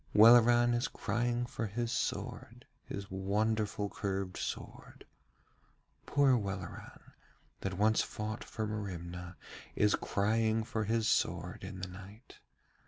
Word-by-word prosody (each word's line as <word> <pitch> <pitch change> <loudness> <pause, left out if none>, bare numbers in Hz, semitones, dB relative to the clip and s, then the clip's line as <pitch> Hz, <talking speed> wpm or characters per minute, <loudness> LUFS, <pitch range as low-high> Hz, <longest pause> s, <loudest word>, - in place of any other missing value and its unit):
'Welleran 120 +2 +7
is 120 0 +1
crying 120 +3 -1
for 115 -2 -4
his 115 +3 -2
sword, - - -3 0.2
his 100 -1 -6
wonderful 105 +2 0
curved 95 -2 -3
sword. - - -6 1.0
Poor 140 -2 +4
Welleran, 95 -5 -6 0.5
that 95 -1 -3
once 110 +2 +4
fought 110 +2 -4
for 110 - -4
Merimna, 90 -4 -5 0.4
is 105 -1 +3
crying 110 +2 +1
for 110 -1 -2
his 110 +1 +1
sword - - 0
in 95 - -7
the 95 - -3
night. 100 +6 -12
105 Hz, 115 wpm, -33 LUFS, 95-115 Hz, 1.0 s, Welleran